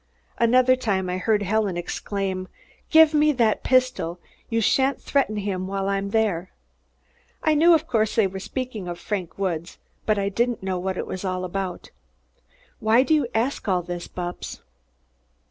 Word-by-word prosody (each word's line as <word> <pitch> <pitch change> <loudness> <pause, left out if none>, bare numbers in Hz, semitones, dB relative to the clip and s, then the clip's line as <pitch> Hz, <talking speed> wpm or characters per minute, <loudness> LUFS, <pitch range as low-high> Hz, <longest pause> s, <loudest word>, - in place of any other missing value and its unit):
Another 255 +2 +5
time 195 -7 -1
I 180 - -2
heard 210 +1 +1
Helen 200 -2 0
exclaim, 190 +1 -3 0.4
'Give 320 -1 +7
me 300 0 +4
that 230 -5 +2
pistol! 255 -10 +1 0.3
You 230 - +1
shan't 265 +5 +2
threaten 265 -7 0
him 190 -2 -2
while 195 0 -2
I'm 200 0 -1
there!' 200 -5 0 0.9
I 310 - +3
knew, 330 +3 +6
of 320 0 0
course, 220 -6 0
they 220 - +4
were 190 0 -4
speaking 235 -3 -5
of 175 -1 -4
Frank 185 -3 -4
Woods, 175 -3 -3 0.3
but 215 -1 +3
I 200 0 0
didn't 235 +1 -1
know 190 -1 -1
what 190 +1 -3
it - - -2
was 185 - -6
all 185 -1 -2
about. 185 0 -5
But - - -42 0.4
why 225 +3 +4
do 315 - +1
you 295 -5 +2
ask 235 +2 -1
all 180 -2 +1
this, 175 0 -5
Bupps?" 175 -1 -6
200 Hz, 170 wpm, -24 LUFS, 185-250 Hz, 0.9 s, Give